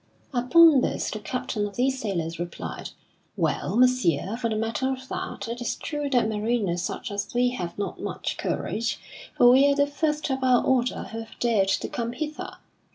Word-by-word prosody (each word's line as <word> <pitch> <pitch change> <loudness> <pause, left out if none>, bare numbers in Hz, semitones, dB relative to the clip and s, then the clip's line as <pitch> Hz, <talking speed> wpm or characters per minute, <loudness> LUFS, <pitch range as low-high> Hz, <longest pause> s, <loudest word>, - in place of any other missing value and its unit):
Upon 275 +4 +6
this - - -1
the 215 - -4
captain 230 -2 -2
of 200 - -11
these 260 +1 +1
sailors 170 -6 -3
replied: 175 0 -5 0.5
"Well, - - 0
Messire, 225 - +3
for 235 -1 -2
the 220 - -1
matter 225 +4 -1
of 260 0 -6
that, 200 - -5
it 235 +1 -5
is 240 - -1
true 295 -2 -3
that 245 -5 +3
mariners 210 -5 0
such 215 +5 -4
as 200 0 -3
we 245 +1 +3
have 175 -9 -5
not 200 -1 -4
much - - -3
courage, 225 +2 -2 0.4
for 245 - +7
we 270 +3 +6
are - - +2
the 285 0 +4
first 300 0 -1
of 265 0 -1
our 250 -2 +4
order 255 -1 +1
who 225 - -5
have 225 0 -10
dared 220 -5 +2
to - - 0
come 235 -1 -3
hither. 300 +4 -5
240 Hz, 190 wpm, -26 LUFS, 210-260 Hz, 0.5 s, for